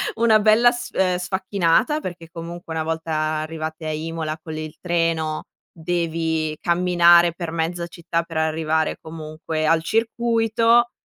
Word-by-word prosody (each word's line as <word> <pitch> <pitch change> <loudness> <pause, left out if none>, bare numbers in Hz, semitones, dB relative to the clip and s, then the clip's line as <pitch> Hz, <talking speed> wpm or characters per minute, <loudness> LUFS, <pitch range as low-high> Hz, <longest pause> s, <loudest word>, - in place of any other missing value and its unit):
una 225 -2 +4
bella 220 +3 +5
sf 240 0 -7
ehm, 185 -1 +2
sfacchinata. 190 - +1
Perché 175 - -7
comunque 170 0 -7
una 160 0 -1
volta 160 0 -3 0.3
arrivate 160 0 -5
a 155 - -2
Imola 160 0 -4
con 160 -1 -7
il 155 -1 -6
treno, 165 -3 -1 0.3
devi 160 -2 -2
camminare 175 -1 +5
per 170 -1 -5
mezza 170 +1 -2
città 170 0 -3
per 165 -1 -7
arrivare 160 0 0
comunque 155 0 -4
al 160 0 +3
circuito. 230 +2 +2
165 Hz, 135 wpm, -22 LUFS, 160-185 Hz, 0.3 s, bella